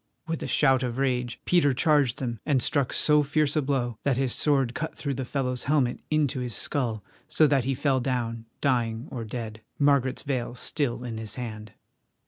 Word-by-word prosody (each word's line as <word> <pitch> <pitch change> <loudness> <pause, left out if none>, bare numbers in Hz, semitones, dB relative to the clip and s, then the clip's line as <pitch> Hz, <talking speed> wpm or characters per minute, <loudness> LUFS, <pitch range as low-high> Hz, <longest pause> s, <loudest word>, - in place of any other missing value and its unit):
With 165 -1 -3
a - - -3
shout 135 -3 +3
of 125 -1 -2
rage 125 -3 -1
Peter 145 -7 +3
charged 145 -4 +3
them, 120 -4 -3
and 140 -4 +2
struck 135 +1 +1
so 150 -1 +4
fierce 150 +1 +1
a 155 - +3
blow 130 -5 -1
that 135 -3 +1
his 130 -2 +1
sword 135 -5 +2
cut 160 +4 -4
through 140 -2 -2
the 130 0 -4
fellow's 125 -1 -2
helmet 135 -4 +1
into 150 -3 +1
his 125 -3 -4
skull, 115 -8 -2 0.2
so 155 +1 +4
that 140 -4 +2
he 135 0 0
fell 135 0 +1
down, 120 -3 -2
dying 120 -2 0
or 120 -4 -4
dead, 110 -1 -6 0.2
Margaret's 140 -3 +2
veil 125 -3 -2
still 125 -2 -2
in 115 -3 -5
his 110 -1 -6
hand. 110 -4 -7
130 Hz, 190 wpm, -27 LUFS, 120-145 Hz, 0.2 s, so